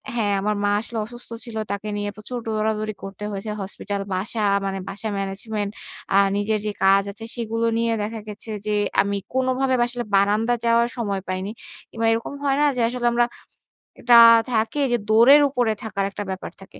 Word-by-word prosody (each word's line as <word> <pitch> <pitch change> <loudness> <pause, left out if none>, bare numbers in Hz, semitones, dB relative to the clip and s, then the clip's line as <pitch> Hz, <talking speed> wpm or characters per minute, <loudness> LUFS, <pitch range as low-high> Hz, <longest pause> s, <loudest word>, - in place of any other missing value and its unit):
হ্যাঁ, 210 -4 +1
আমার 210 +1 0
মা 205 - +2
আসলে 230 0 -7
অসুস্থ 240 +2 -11 0.2
ছিল। 230 -2 -9 0.2
তাকে 200 +1 -4
নিয়ে 205 0 -2
প্রচুর 215 +4 -7
দৌড়াদৌড়ি 215 0 -1
করতে 195 +1 -8
হয়েছে। 200 +2 -5
হসপিটাল 200 +1 -4
বাসা 205 +4 -2 0.2
মানে 195 0 -2
বাসা 220 +2 -5
ম্যানেজমেন্ট 200 +1 -3 0.4
আ - - +7 0.2
নিজের 210 +1 0
যে 210 - 0
কাজ 195 +1 +5
আছে 215 +3 -9
সেগুলো 230 -1 -1
নিয়ে 230 0 +1
দেখা 220 +2 -4
গেছে 210 +1 -8 0.2
যে, 210 - +1 0.3
আমি 200 0 -1 0.2
কোনোভাবে 260 0 +1
আসলে 245 0 -4
বারান্দায় 215 +4 +2
যাওয়ার 235 0 +3
সময় 200 -5 -2
পাইনি। 185 +2 -3 0.4
কিংবা 225 0 -3
এরকম 225 +4 -2
হয় 275 -1 +2
না - - +5
যে, 245 - 0
আসলে 240 0 -1
আমরা 240 0 +3 0.7
এটা 240 -1 +6 0.3
থাকে 225 +5 0
যে 240 - +3
দৌড়ের 240 +7 +7
উপরে 245 -4 +1
থাকার 200 -3 -2
একটা 205 - -5
ব্যাপার 190 0 -5
থাকে। 195 - -14
220 Hz, 180 wpm, -23 LUFS, 200-235 Hz, 0.7 s, আ